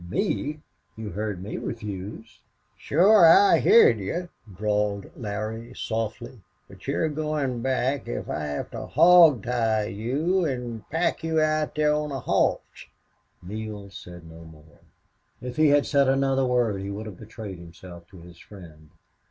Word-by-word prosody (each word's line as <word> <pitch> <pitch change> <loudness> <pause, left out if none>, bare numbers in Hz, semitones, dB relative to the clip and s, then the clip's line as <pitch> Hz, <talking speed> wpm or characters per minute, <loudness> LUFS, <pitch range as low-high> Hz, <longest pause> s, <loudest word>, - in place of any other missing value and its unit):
"Me!... 155 - -2 0.4
You 110 -1 -7
heard 105 -1 -4
me 105 - -6
refuse." 105 0 -7 0.4
"Shore 190 +6 +4
I 200 +5 +6
heerd 120 - +5
you," 170 - -4 0.2
drawled 105 +1 -2
Larry, 110 +1 -6
softly, 115 +2 -5 0.3
"but 95 +4 -15
you're 145 +4 0
goin' 150 -5 -2
back 130 +1 -1
if - - -5
I 75 - -3
have 75 -1 -5
to - - -7
hawg 165 - +6
tie 115 -3 0
you 140 - -1
an' 125 - -4
pack 165 +1 -1
you 160 -1 0
out 155 0 0
there 150 0 +2
on 150 0 -2
a 135 - -4
hoss." - - -1 0.6
Neale 105 +1 -7
said 85 -3 -11
no 80 0 -12
more. 80 -1 -17 0.6
If 125 0 -7
he 155 0 +4
had 145 0 +4
said 140 -2 +2
another 135 -1 +1
word 120 -6 0
he 100 - -5
would 105 +2 -6
have 100 -5 -10
betrayed 105 -4 -9
himself 85 0 -13
to 95 -3 -15
his 85 0 -15
friend. 80 -6 -14
115 Hz, 150 wpm, -25 LUFS, 100-145 Hz, 0.6 s, I